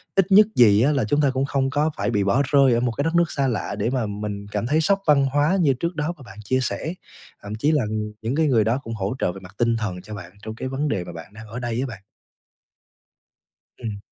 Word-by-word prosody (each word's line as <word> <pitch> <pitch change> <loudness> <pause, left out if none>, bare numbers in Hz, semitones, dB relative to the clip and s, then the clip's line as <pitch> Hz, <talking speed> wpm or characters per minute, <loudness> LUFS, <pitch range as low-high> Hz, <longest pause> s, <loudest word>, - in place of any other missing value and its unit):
ít 195 0 +2
nhất 210 +2 +8
gì 105 -3 +6
á 140 +5 +4
là 140 -6 +1
chúng 145 +7 +1
ta 140 - +3
cũng 130 +1 0
không 135 -1 0
có 145 +3 +1
phải - - -1
bị 100 -3 +1
bỏ 110 +8 +2
rơi 135 -4 +5
ở 115 - +2
một 120 0 0
cái 140 - -2
đất 165 +2 -1
nước 170 -1 +3
xa 135 -1 0
lạ 115 -5 -2
để 105 - 0
mà 125 -3 -1
mình 105 -1 -5
cảm 105 +2 -2
thấy 155 +4 +2
sốc 195 +5 +2
văn 140 -2 +5
hóa 145 +7 +2
như 140 -5 +4
trước 170 +7 -3
đó 155 +3 -1
mà 145 - -16
bạn 95 -2 -13
chia 130 +5 +1
sẻ, 155 +6 -3 0.5
thậm 100 +1 -5
chí 145 +8 +1
là 150 -4 +2 0.4
những 115 +5 -2
cái 160 -1 +2
người 115 -5 +3
đó 115 +5 +1
cũng 115 - -6
hỗ 100 +3 -2
trợ - - +1
về 95 - -9
mặt 95 +1 -14
tinh 115 -1 +2
thần 95 -5 -4
cho 105 +3 -8
bạn 95 -4 -9
trong 110 - -6
cái 130 - -5
vấn 135 +3 -2
đề 100 -8 -1
mà 90 0 -9
bạn 85 +4 -10
đang 110 0 -11
ở 115 +4 -6
đây 120 -1 -2
á 135 - -2
bạn. 105 -6 -9 1.8
Ừm. 110 -4 -5
125 Hz, 270 wpm, -23 LUFS, 105-145 Hz, 1.8 s, nhất